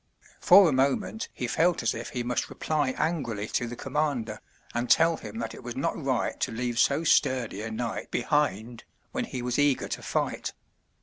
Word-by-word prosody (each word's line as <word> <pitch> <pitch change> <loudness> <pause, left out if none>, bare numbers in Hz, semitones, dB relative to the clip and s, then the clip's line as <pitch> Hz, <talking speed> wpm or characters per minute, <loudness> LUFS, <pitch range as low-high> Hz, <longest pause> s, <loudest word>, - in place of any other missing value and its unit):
For 200 -2 +8
a - - +2
moment 140 +11 0
he 125 - -4
felt 165 +5 +2
as 115 - +2
if 115 +1 -6
he 125 - -3
must 125 +1 -1
reply 145 -4 -1
angrily 125 -11 -1
to 120 - -1
the 120 - -6
commander, 130 -6 -2 0.3
and 120 +1 -2
tell 165 0 +5
him 110 0 -8
that 115 -1 -4
it - - -10
was - - -6
not - - -1
right - - -1
to - - -1
leave 120 +1 -2
so 140 +6 +3
sturdy 125 -9 +2
a 110 - -4
knight 115 +1 -4
behind, 120 -6 0 0.3
when 255 -2 -2
he 130 - -5
was 125 +2 -1
eager 145 -2 +2
to - - -4
fight. - - -2
125 Hz, 190 wpm, -27 LUFS, 115-150 Hz, 0.3 s, For